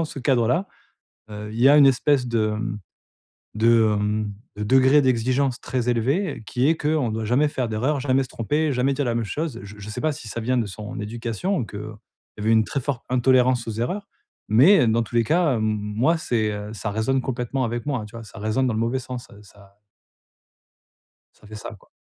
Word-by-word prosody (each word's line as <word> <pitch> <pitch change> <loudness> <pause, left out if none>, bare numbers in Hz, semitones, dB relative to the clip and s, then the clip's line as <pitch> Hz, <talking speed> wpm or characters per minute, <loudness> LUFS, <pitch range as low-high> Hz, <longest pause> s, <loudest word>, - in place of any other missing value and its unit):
dans 165 - +1
ce 150 - -8
cadre-là, 125 - +1 0.6
heu, 105 0 -7
il 115 - -3
y 135 - +7
a 145 - +7
une 140 -2 +8
espèce 135 0 +2
de, 115 -2 +1
mmh, 105 0 -3 0.8
de, 110 -1 +4
hem, 105 0 -1 0.2
de 105 - -5
degré 130 +5 +5
d'exigence 130 +1 +1
très 125 -2 -2
élevé, 125 - 0
qui 130 +4 +1
est 165 - +3
qu'on 150 -6 0
doit 110 0 -3
jamais 135 +7 +3
faire 125 -5 -2
d'erreurs, 130 +7 0
jamais 135 0 +2
se - - -12
tromper, 150 +7 -1
jamais 130 +2 +1
dire 145 +1 -1
la 120 - 0
même 115 - -1
chose. 150 +1 -3
Je 105 +1 -11
je 105 +1 -8
sais - - -5
pas 155 -1 +1
si 135 -6 -9
ça 115 - -6
vient 125 +3 0
de 115 - 0
son 105 +2 -7
éducation 115 - -3
ou 115 - -2
qu'il 105 - -8 0.6
y - - -7
avait 110 +2 +2
une 110 -1 +5
très 140 - -3
forte 130 -1 -4
intolérance 125 -1 +3
aux - - -2
erreurs, 155 - -3 0.4
mais, 140 - +6
heu, 120 - +3
dans 115 +1 +2
tous 120 - -13
les 115 - +4
cas, 160 +1 +2
hem, 110 - -1
moi, 110 +8 0
c'est, 110 -7 -1
heu, 105 +1 -6
ça 105 0 -4
résonne 120 +5 0
complètement 130 +1 -2
avec 120 +2 -3
moi 125 -7 -2
tu 105 - -16
vois? 115 - -7
Ça 105 - -12
résonne 110 +5 0
dans 110 - -1
le - - -1
mauvais 120 +3 0
sens, 125 -1 -7
heu, 105 +1 -15
ça 100 -1 -19 1.6
Ça 105 - -19
fait 110 - -11
ça, - - -7
quoi. - - -25
120 Hz, 225 wpm, -23 LUFS, 110-135 Hz, 1.6 s, une